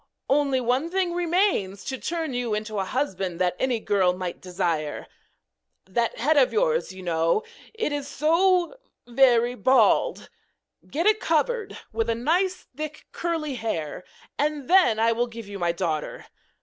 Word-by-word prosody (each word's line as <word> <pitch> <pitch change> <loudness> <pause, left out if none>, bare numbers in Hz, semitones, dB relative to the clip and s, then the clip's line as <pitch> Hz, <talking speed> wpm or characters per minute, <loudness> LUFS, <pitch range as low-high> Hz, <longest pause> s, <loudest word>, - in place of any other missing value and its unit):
Only 275 -2 +3
one 255 +6 0
thing 365 -1 0
remains 345 - 0
to 265 -1 -4
turn 325 -4 -3
you 245 -3 -1
into 215 -1 -3
a 190 - -1
husband 190 -8 -2
that 180 -1 +1
any 255 -3 +1
girl 190 -4 +2
might 180 -2 -5
desire. 170 -4 -2 0.8
That 230 +5 -1
head 295 +7 +2
of 265 -3 +5
yours, 485 - +1
you 185 0 -10
know 165 - +1 0.3
it 445 -9 -1
is 290 -1 -3
so 345 - +2 0.3
very 245 -1 +4
bald! 260 - +2 0.6
Get 325 +5 -1
it 430 0 +4
covered 410 +7 0 0.2
with 225 +1 -1
nice 335 +11 0
thick 300 0 -7
curly 325 -4 -2
hair, 180 - -4 0.4
and 295 -2 -1
then 355 -11 +5
I 230 +1 +4
will 240 +2 0
give 230 -2 -9
you 200 -1 -7
my 175 -1 +1
daughter. 170 -3 -3
255 Hz, 150 wpm, -25 LUFS, 200-330 Hz, 0.8 s, of